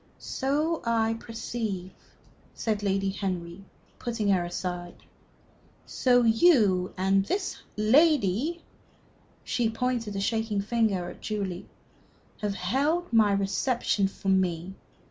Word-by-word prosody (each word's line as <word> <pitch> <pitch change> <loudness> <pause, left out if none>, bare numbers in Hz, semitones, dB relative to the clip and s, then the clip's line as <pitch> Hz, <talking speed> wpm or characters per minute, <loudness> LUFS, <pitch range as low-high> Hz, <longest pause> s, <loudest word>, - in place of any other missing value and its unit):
"So 300 +5 -1
I 225 -1 +1
perceive," 220 -5 -4 0.6
said 215 -2 -1
Lady 195 -1 0
Henry, 185 -2 -4 0.4
putting 230 -4 -2
her 185 -3 +3
aside. 175 0 -4 0.9
"So 245 -1 +3
you, 225 - +4
and 195 +1 +3
this 375 - -3 0.2
lady" 275 - +3 0.8
she 240 -3 0
pointed 230 -2 -2
a - - -1
shaking 220 0 0
finger 205 -4 0
at - - -14
Julie 195 -4 -4 0.7
"have 205 -2 -1
held 280 - 0
my 215 -3 +5
reception 200 +1 +1
for 195 0 -5
me. 185 -1 +1
210 Hz, 105 wpm, -27 LUFS, 190-240 Hz, 0.9 s, my